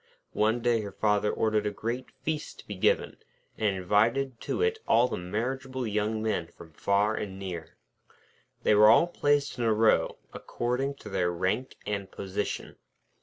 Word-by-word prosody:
One 110 +3 +2
day 120 -1 +2
her 100 -1 -6
father 105 -1 +1
ordered 110 -1 +1
a - - +2
great 115 +5 -4
feast 155 -1 -3
to - - -14
be 105 - -5
given, 95 - +1 0.4
and 105 -3 0
invited 115 +7 +1
to - - -2
it 450 0 +1
all 120 +2 +5
the - - -3
marriageable 130 +8 -3
young 110 +1 -1
men 105 -6 -1
from 80 -1 -15
far 100 +5 +2
and 95 -3 -4
near. 90 -4 -7 0.9
They - - +4
were 105 +1 +7
all 165 - +7
placed 145 -5 0
in - - 0
a 115 - +3
row, 110 +1 +3 0.2
according 130 +4 -2
to - - -6
their 90 -3 0
rank 95 +9 -1
and 100 -2 -3
position. 100 +1 -4
110 Hz, 170 wpm, -28 LUFS, 100-125 Hz, 0.9 s, were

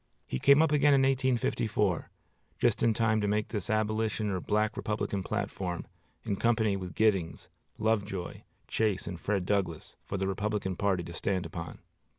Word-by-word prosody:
He 65 - -3
came 140 +3 +6
up 160 - +2
again 145 -1 +5
in 135 - +4
1854, 120 -7 +1 0.5
just - - +2
in 115 - +4
time 110 -2 +2
to 105 - 0
make 105 +1 0
this 105 0 -4
Abolition 110 0 0
or 95 - -1
Black 105 +3 0
Republican 105 -2 -2
platform, 90 -1 -3 0.4
in 100 - -2
company 110 -3 +2
with 90 -4 -6
Giddings, 95 -7 +1 0.3
Lovejoy, 105 -4 -1 0.3
Chase, 105 -4 0
and 90 - -5
Fred 100 -3 0
Douglass, 90 -5 -2
for 100 - -4
the 95 0 -1
Republican 100 -1 -1
party 95 -2 0
to 85 0 -8
stand 95 +1 -1
upon. - - -7
105 Hz, 165 wpm, -30 LUFS, 95-110 Hz, 0.5 s, came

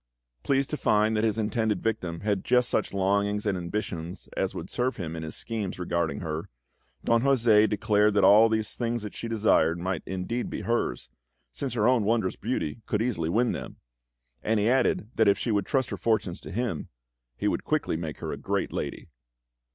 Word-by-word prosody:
Pleased 135 0 +1
to 150 - -1
find 110 -2 +2
that 105 - +1
his 110 -1 +1
intended 110 -2 0
victim 90 -7 -2
had 100 -2 0
just 125 -1 +3
such - - 0
longings 100 +2 +1
and 100 -2 +1
ambitions 85 -2 -4
as - - -1
would - - -6
serve 125 +2 -1
him 85 -4 -4
in 80 - -5
his 80 -1 -6
schemes 110 -5 -4
regarding 85 -5 -1
her, 80 -1 -4 0.5
Don 115 0 +3
José 115 -5 +4
declared 105 0 +2
that 100 - +4
all 110 +3 +7
these 110 -1 -1
things 120 -2 -2
she 115 - -6
desired 105 -7 +3
might 90 0 -2
indeed 95 +6 -3
be - - -4
hers, 115 - -1 0.4
since 130 - -4
her 110 -1 +2
own 125 -3 +4
wondrous 110 -3 +1
beauty 75 +9 -3
could 110 0 0
easily 90 -10 -1
win 115 +7 +2
them; - - -6 0.7
and 110 0 +1
he 105 - +2
added 125 -3 +2
that 110 - +3
if 100 - +5
she 120 - -2
would 100 -1 0
trust 130 -3 0
her - - -3
fortunes 105 -5 0
to - - -10
him, 110 -6 -2 0.5
he - - -1
would - - 0
quickly - - 0
make 80 -3 -5
her - - -3
a - - -4
great - - -2
lady. - - -4
105 Hz, 195 wpm, -27 LUFS, 90-115 Hz, 0.7 s, all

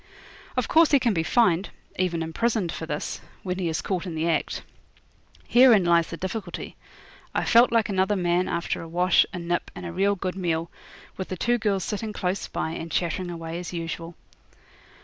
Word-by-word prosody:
Of - - +1
course 325 0 +5
he 280 - +5
can 235 -3 +2
be 165 - +1
fined 180 -1 +2 0.3
even 170 -3 0
imprisoned 195 +2 0
for 160 - -6
this 150 -1 -4 0.2
when 180 0 -3
he 175 -3 0
is 160 - -2
caught 185 -1 -2
in 170 - -5
the 160 +1 0
act. 165 - -1 0.8
Herein 240 -6 +6
lies 170 -1 +4
the 165 - -6
difficulty. 190 -1 -5 0.6
I - - +1
felt 235 +1 +6
like 230 -2 +3
another 190 +1 +1
man 175 -1 +1
after 170 - -2
a 165 - -8
wash, 180 +2 +3
a - - -5
nip, 175 0 -2
and 180 - -7
a 170 - -4
real 200 +3 +2
good 185 -1 -3
meal, 170 -3 -1 0.5
with 190 - -4
the 185 - -5
two 240 +6 +1
girls 200 -4 0
sitting 210 +2 -3
close 185 -1 -2
by, 160 - -3
and 165 0 -6
chattering 175 +1 -1
away 165 0 -5
as 180 0 -7
usual. 165 0 -5
180 Hz, 190 wpm, -25 LUFS, 170-200 Hz, 0.8 s, Herein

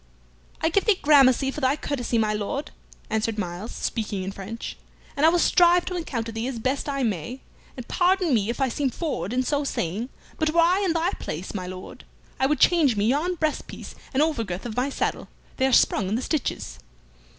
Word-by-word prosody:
"I 320 - +3
give 390 +4 +1
thee 430 -4 +4
gramercy 270 -2 +5
for 300 - -6
thy 260 +1 +3
courtesy, 260 -5 -2
my 215 -1 +2
Lord," 270 +8 -3 0.4
answered 220 0 0
Myles, 180 +2 -4
speaking 210 -4 -3
in 190 - -4
French; 200 +4 -7 0.4
"and 295 +3 +4
I - - +8
will 350 - +3
strive 350 0 +4
to 365 - -3
encounter 240 -10 -3
thee 225 +2 -3
as 265 -3 -4
best 260 +5 -1
I 275 -1 -1
may, 225 - -3 0.4
and 250 - -7
pardon 360 -3 +2
me 215 -2 +2
if 235 - -3
I 270 - +2
seem 270 +2 -1
forward 285 - -3
in 255 +1 +1
so 285 +3 0
saying, 220 -1 -2 0.3
but 315 -1 +2
were 335 +2 +2
I 350 +3 +4
in 360 -4 +1
thy 335 +2 +1
place, 170 +5 -5
my 185 -3 -4
Lord, 185 0 -9 0.4
I 265 - +3
would 300 +1 0
change 310 -9 +4
me 205 - +2
yon 320 +7 +1
breast 310 -2 -1
piece - - -9 0.2
and 280 +2 +3
over 310 -7 0
girth 180 0 -5
of 225 -3 -5
my 255 +3 0
saddle; - - -2 0.3
they 265 - +3
are - - 0
sprung 200 -5 +3
in 210 - 0
the 250 - -2
stitches." 65 - -3
260 Hz, 215 wpm, -25 LUFS, 220-310 Hz, 0.4 s, I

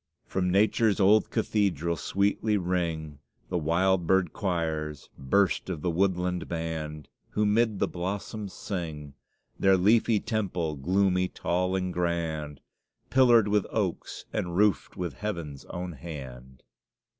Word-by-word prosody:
From 90 -1 -1
nature's 105 +2 +3
old 105 +2 +5
cathedral 95 -7 0
sweetly 100 +4 0
ring 85 -5 -2 0.3
The 90 - 0
wild 85 +2 +2
bird 95 -3 +2
choirs 80 -6 -2
burst 95 +9 +1
of 80 -5 -4
the 90 - +1
woodland 90 0 0
band, 80 -3 -4 0.2
who 105 - 0
mid 110 0 +2
the - - +1
blossoms 100 +3 -4
sing; 80 -9 -5 0.5
Their 95 0 +5
leafy 110 +3 +4
temple, 90 -9 -2
gloomy, 90 +5 +2
tall 90 +1 -1
and 90 -1 -1
grand, 80 -4 -2 0.5
Pillared 120 -5 +6
with 105 -1 +1
oaks, - - -3
and 85 -1 -2
roofed 105 -2 +2
with 90 -2 -3
Heaven's 85 -10 -5
own 90 0 -5
hand. 65 -5 -9
90 Hz, 125 wpm, -28 LUFS, 80-100 Hz, 0.5 s, Pillared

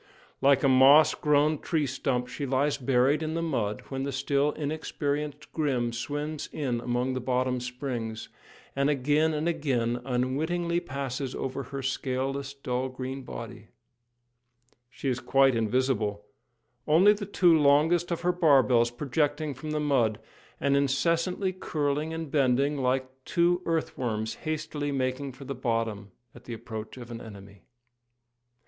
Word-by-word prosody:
Like 140 0 +4
a - - +5
moss 135 +4 +7
grown 150 0 +2
tree 160 -4 0
stump 125 -1 -1
she 140 +3 -5
lies 135 +3 +1
buried 135 +3 +2
in 160 0 -2
the 165 - -1
mud 105 -10 -1
when 135 -1 -3
the 140 +1 -2
still 140 +2 +1
inexperienced 150 -1 -3
Grim 130 -7 0
swims 145 +5 -4
in 130 -6 -2
among 125 +2 -1
the 130 - -2
bottom 125 0 0
springs, 125 -3 -5 0.5
and 140 +1 +2
again 150 +3 +2
and 155 +1 -1
again 125 -8 0
unwittingly 155 +8 0
passes 135 -3 -4
over 135 +1 -3
her 135 -1 -6
scaleless, 135 +1 -2
dull 130 -1 -2
green 130 +1 -5
body. 115 -3 -8 1.2
She 135 - -6
is 125 -2 0
quite 135 0 +4
invisible, 110 -3 0 0.6
only 180 +7 +6
the 200 -1 -6
two 180 -4 +4
longest 155 +4 +4
of 170 - -2
her 180 +1 +2
barbels 130 -8 +4
projecting 145 +4 -1
from 135 +4 -8
the 155 0 -1
mud, 130 -8 +2 0.4
and 140 0 +2
incessantly 170 +7 +1
curling 150 -3 -2
and 160 -3 -5
bending 140 0 +2
like 130 -1 0 0.2
two 175 +3 +2
earth 165 -1 -1
worms 110 -3 -2 0.2
hastily 150 -2 -3
making 130 0 -2
for 135 +2 -11
the 140 - -4
bottom 115 -5 -2 0.2
at 120 - -15
the 120 - -5
approach 110 +1 -7
of 120 -1 -9
an 115 0 -6
enemy. 100 -2 -12
135 Hz, 145 wpm, -28 LUFS, 125-150 Hz, 1.2 s, moss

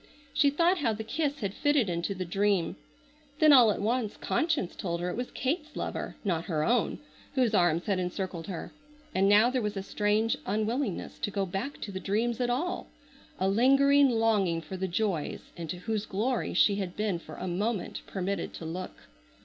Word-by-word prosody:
She 285 - +4
thought 340 +6 +2
how 230 -7 +1
the 220 +1 -5
kiss 285 +4 -2
had 200 -2 -2
fitted 290 -4 +2
into 175 +3 -2
the 185 0 -3
dream. 195 0 +1 0.6
Then 310 -1 +7
all 245 -5 +8
at 205 - 0
once 230 -1 0
conscience 320 - 0
told 170 -2 -3
her 180 +1 -2
it - - -4
was 245 +2 -3
Kate's 300 +3 -2
lover, - - -4
not 170 -5 -1
her 155 -5 0
own, 235 +3 +1 0.4
whose 250 -4 +2
arms 175 -3 +3
had 195 -3 +1
encircled 180 -2 -3
her. 185 -4 -6 0.4
And 195 +1 +3
now 215 +4 +6
there 255 -1 0
was 210 -2 -2
a 195 - -3
strange 210 +3 +1
unwillingness 215 +2 -2
to - - -1
go 195 -1 -1
back 195 +10 -4
to 205 - -5
the 190 - -4
dreams 225 +5 0
at 245 - +1
all, 315 +9 -1 0.5
a 190 - +2
lingering 275 +6 +5
longing 215 -7 +2
for 165 +3 -8
the 190 0 -2
joys 185 -3 -2
into 170 0 -5
whose 215 +3 -3
glory 230 +6 -1
she 200 -1 +4
had 185 -3 -4
been 210 -5 -1
for - - -11
a - - -5
moment 200 +3 -2
permitted 190 -1 -3
to 165 - -7
look. 180 +3 -6
205 Hz, 190 wpm, -29 LUFS, 185-245 Hz, 0.6 s, all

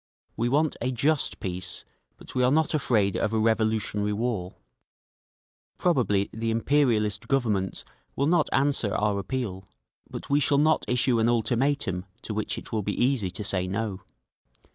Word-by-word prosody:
"We 120 +1 0
want 150 +4 +2
a 125 +2 0
just 140 +4 +1
peace, 90 -1 -4 0.3
but - - -12
we 125 - +1
are 125 - +4
not 155 +4 +2
afraid 110 -9 +1
of 110 - 0
a - - +2
revolutionary 110 -2 +1
war…. 105 -5 -2 1.2
Probably 120 - +2
the 115 +1 -2
imperialist 115 -4 +1
Governments 110 -8 0 0.3
will 140 - +1
not 160 0 +2
answer 135 -6 +1
our 105 -1 +1
appeal—but 95 - -7
we 140 +1 +3
shall 140 0 +2
not 155 +2 +3
issue 125 -1 +2
an 110 +1 +3
ultimatum 120 -4 +1 0.2
to 110 - -4
which 110 0 -2
it - - -9
will 110 - 0
be 105 +1 -3
easy 120 -6 +2
to 95 +4 -5
say 95 -2 -1
no…. 100 0 -3
115 Hz, 155 wpm, -26 LUFS, 100-135 Hz, 1.2 s, are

